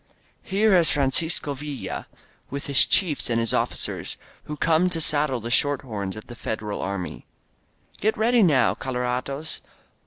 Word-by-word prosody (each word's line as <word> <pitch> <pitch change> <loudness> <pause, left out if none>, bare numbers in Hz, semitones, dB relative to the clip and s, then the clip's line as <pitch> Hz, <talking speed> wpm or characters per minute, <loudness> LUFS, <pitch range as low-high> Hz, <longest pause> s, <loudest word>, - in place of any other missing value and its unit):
Here 205 +2 +2
is 170 -3 +4
Francisco 145 +2 0
Villa 145 0 -6 0.4
With 140 +1 -5
his 140 -2 +4
chiefs 170 -10 +2
and 115 -1 +1
his 115 -1 -1
officers^ - - -2 0.3
Who 150 - -6
come 165 +4 +3
to 170 -2 -1
saddle 150 -4 +4
the 115 +1 -6
short 145 +2 +3
horns 100 -6 -5
Of 110 - -9
the 120 - -10
Federal 105 -3 -4
Army. 95 -2 -5 0.7
Get 220 +1 0
ready 235 +2 +3
noWj 140 - +3
colorados. 130 +4 -2
140 Hz, 150 wpm, -24 LUFS, 120-160 Hz, 0.7 s, is